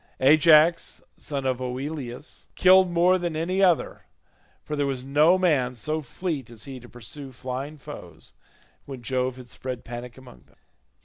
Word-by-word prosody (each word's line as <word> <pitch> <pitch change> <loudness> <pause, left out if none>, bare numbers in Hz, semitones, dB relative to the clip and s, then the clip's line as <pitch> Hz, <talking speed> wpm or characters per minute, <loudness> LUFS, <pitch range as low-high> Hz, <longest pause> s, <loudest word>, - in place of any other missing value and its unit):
Ajax 155 +4 +5
son 140 -2 -5
of 130 -1 -1
Oileus 130 +1 -6
killed 185 0 +6
more 175 +2 +3
than 175 -2 -3
any 180 +5 -1
other, 180 -4 +1 0.6
for 150 - -4
there 145 -1 0
was 130 -2 -3
no 150 +7 +4
man 145 -9 +1
so 155 +7 -2
fleet 150 -3 -4
as 115 -2 -7
he 135 -2 -7
to 120 0 -14
pursue 130 +4 -9
flying 130 +4 -6
foes 140 - -11 0.5
when 135 -3 -9
Jove 130 0 -1
had 125 -2 -12
spread 125 +1 -6
panic 120 +1 -8
among 125 - -15
them. - - -28
140 Hz, 160 wpm, -25 LUFS, 125-160 Hz, 0.6 s, killed